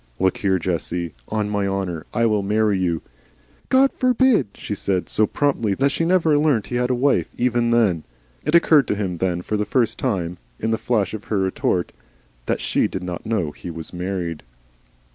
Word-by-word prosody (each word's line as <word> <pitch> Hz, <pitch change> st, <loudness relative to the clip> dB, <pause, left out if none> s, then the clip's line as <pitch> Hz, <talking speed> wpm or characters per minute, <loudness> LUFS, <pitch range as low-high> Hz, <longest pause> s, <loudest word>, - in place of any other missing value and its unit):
Look 95 Hz, 0 st, +2 dB
here, 95 Hz, -2 st, +1 dB
Jessie 85 Hz, 0 st, -2 dB
on 105 Hz, -1 st, -1 dB
my 100 Hz, -1 st, 0 dB
honour, 95 Hz, -5 st, -3 dB
I 115 Hz, -, +1 dB
will 105 Hz, -2 st, +2 dB
marry 105 Hz, +1 st, +2 dB
you 85 Hz, -3 st, -1 dB, 0.3 s
" -, -, -36 dB, 0.3 s
"God 270 Hz, +1 st, +5 dB
forbid," 255 Hz, -, +3 dB
she -, -, -5 dB
said, 95 Hz, -3 st, -1 dB
so 110 Hz, 0 st, +2 dB
promptly 115 Hz, -8 st, 0 dB
that 140 Hz, +4 st, +2 dB
she 165 Hz, -, 0 dB
never 165 Hz, -4 st, +3 dB
learnt 145 Hz, -9 st, +2 dB
he 120 Hz, -, -3 dB
had 125 Hz, 0 st, 0 dB
a 125 Hz, -, +2 dB
wife, 135 Hz, +3 st, +2 dB
even 120 Hz, -1 st, +1 dB
then. 105 Hz, -9 st, +2 dB, 0.4 s
It 150 Hz, -, +1 dB
occurred 155 Hz, -4 st, +5 dB
to -, -, 0 dB
him 95 Hz, -4 st, -2 dB
then 90 Hz, -1 st, -1 dB
for 105 Hz, -, -1 dB
the 105 Hz, -, 0 dB
first 120 Hz, +1 st, 0 dB
time, 90 Hz, -8 st, -2 dB, 0.2 s
in 110 Hz, -, -1 dB
the 110 Hz, -, 0 dB
flash 110 Hz, -6 st, 0 dB
of 105 Hz, -2 st, -6 dB
her 105 Hz, -, -1 dB
retort, 95 Hz, -2 st, 0 dB, 0.6 s
that -, -, 0 dB
she -, -, +1 dB
did 95 Hz, -, -5 dB
not 90 Hz, +2 st, -5 dB
know 100 Hz, -9 st, 0 dB
he 85 Hz, -, -9 dB
was 80 Hz, 0 st, -7 dB
married. 90 Hz, -3 st, -3 dB
105 Hz, 200 wpm, -22 LUFS, 90-125 Hz, 0.6 s, God